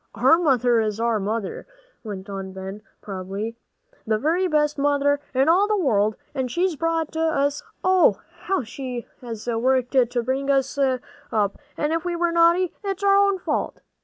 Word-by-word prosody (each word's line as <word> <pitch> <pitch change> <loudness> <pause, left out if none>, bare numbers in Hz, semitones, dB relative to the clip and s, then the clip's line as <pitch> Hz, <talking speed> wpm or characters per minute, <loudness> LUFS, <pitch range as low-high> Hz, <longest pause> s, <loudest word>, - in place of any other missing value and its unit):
"Our 325 - +5
mother 250 -7 +3
is 215 -1 -1
our 230 -1 +1
mother," 210 0 -3 0.4
went 200 -3 -7
on 195 -1 -6
Ben, 190 +2 -7 0.2
proudly, 195 +3 -5 0.5
"the 220 -1 +2
very 335 +10 +1
best 300 -3 +1
mother 285 0 +2
in 265 +2 +2
all 370 +5 +4
the 425 0 +1
world, 215 - +2 0.2
and 260 -3 -2
she's 350 +5 0
brought 325 0 -1
us 290 -3 +1
up, - - -26 0.2
oh, 370 -1 +4 0.2
how 385 -7 -1
she 250 +1 -6 0.2
has 230 -3 -7
worked 250 +2 +1
to 245 -2 +2
bring 265 +3 -1
us 270 -1 +1
up! 245 -6 -1 0.2
and 300 +1 0
if 330 0 -1
we're 345 -1 0
naughty, 340 +1 +3
it's 395 0 -3
all 400 - +4
our - - +6
own 400 -1 +4
fault!" 360 - -2
270 Hz, 170 wpm, -23 LUFS, 225-330 Hz, 0.5 s, our